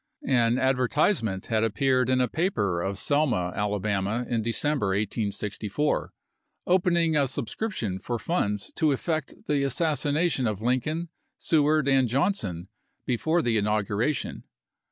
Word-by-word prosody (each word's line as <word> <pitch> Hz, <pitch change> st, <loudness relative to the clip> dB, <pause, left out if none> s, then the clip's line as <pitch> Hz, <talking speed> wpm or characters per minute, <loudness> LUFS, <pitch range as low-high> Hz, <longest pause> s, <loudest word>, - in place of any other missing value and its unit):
An 120 Hz, -2 st, +3 dB
advertise 130 Hz, -, +2 dB
ment 95 Hz, -4 st, -3 dB
had 110 Hz, -1 st, 0 dB
appeared 130 Hz, +3 st, +1 dB
in 130 Hz, 0 st, +3 dB
a 125 Hz, -, +2 dB
paper 110 Hz, -, 0 dB
of 95 Hz, +2 st, -2 dB
Selma, 125 Hz, -11 st, +1 dB
Alabama, 105 Hz, +2 st, -1 dB
in 115 Hz, -2 st, 0 dB
December, 115 Hz, +2 st, 0 dB
1864, 105 Hz, +5 st, -2 dB, 0.5 s
opening 170 Hz, -3 st, +2 dB
a 140 Hz, -2 st, +3 dB
subscription 125 Hz, -, -3 dB
for 120 Hz, +4 st, -3 dB
funds 105 Hz, -, -2 dB
to 155 Hz, -2 st, +2 dB
effect 155 Hz, +1 st, -3 dB
the 145 Hz, -2 st, +1 dB
assassination 145 Hz, 0 st, 0 dB
of 105 Hz, -3 st, -2 dB
Lincoln, 140 Hz, +8 st, -1 dB, 0.3 s
Seward, 155 Hz, -2 st, +2 dB
and 135 Hz, -2 st, +4 dB
Johnson 115 Hz, -, -1 dB, 0.4 s
before 160 Hz, +8 st, +1 dB
the 115 Hz, -3 st, +2 dB
inauguration. 105 Hz, +6 st, -1 dB
125 Hz, 125 wpm, -26 LUFS, 105-150 Hz, 0.5 s, and